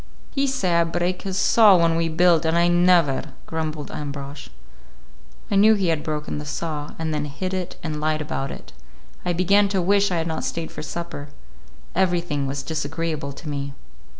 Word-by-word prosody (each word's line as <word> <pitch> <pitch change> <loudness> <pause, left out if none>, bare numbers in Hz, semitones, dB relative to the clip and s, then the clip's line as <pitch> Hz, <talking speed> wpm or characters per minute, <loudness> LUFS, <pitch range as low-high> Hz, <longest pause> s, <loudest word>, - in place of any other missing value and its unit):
"He 275 0 +1
say 260 -10 0
I 170 - +5
break 175 +2 -1
his 190 -2 -3
saw 210 -2 +6
when 165 -1 +3
we 165 0 +1
build, 170 0 +4
and 165 +1 +2
I 170 0 +4
never," 175 -5 +3
grumbled 155 -2 -4
Ambrosch. 140 - -6 1.0
I - - +2
knew 215 +2 +6
he 190 -4 0
had 160 -2 +1
broken 150 -1 -3
the 150 - -7
saw, 150 -1 -4
and 160 -1 -2
then 150 -1 -1
hid 185 +6 -4
it 185 -2 -3
and 155 -2 -3
lied 155 0 +1
about 140 -2 -3
it. - - -10 0.5
I 180 - 0
began 200 +4 +4
to 195 -1 0
wish 200 +3 +3
I 180 - 0
had 165 - 0
not 160 -1 -3
stayed 165 -1 -3
for - - -7
supper. 155 -2 -6 0.7
Everything 170 -6 0
was 140 +1 -3
disagreeable 155 -1 -3
to 140 +3 -10
me. 140 -1 -4
165 Hz, 185 wpm, -23 LUFS, 150-180 Hz, 1.0 s, saw